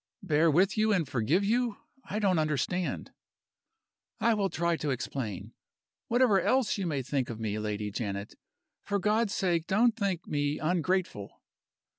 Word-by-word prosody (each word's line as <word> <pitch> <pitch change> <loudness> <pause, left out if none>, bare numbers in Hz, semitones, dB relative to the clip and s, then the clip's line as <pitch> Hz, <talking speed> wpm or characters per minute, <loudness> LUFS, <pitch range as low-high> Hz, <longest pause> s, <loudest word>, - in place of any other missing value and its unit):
"Bear 165 -2 +3
with 190 +7 +3
you 215 0 +3
and 180 -7 +1
forgive 135 - +1
you? 235 0 +1 0.3
I 205 - -4
don't 195 -5 +2
understand." 155 +4 -1 1.1
"I 230 - +3
will 200 -3 0
try 170 0 0
to 150 - -3
explain. 125 -6 -4 0.5
Whatever 235 -5 +4
else 260 +5 +2
you 190 - -1
may 140 -5 -1
think 130 0 -1
of 115 -1 -6
me, 110 -1 -2
Lady 105 -1 -3
Janet, 100 -1 -4 0.5
for 205 - -1
God's 210 +2 +1
sake 170 -3 0
don't 225 +4 +3
think 195 -5 -2
me 145 0 -1
ungrateful!" 175 - -1
170 Hz, 150 wpm, -29 LUFS, 135-200 Hz, 1.1 s, Whatever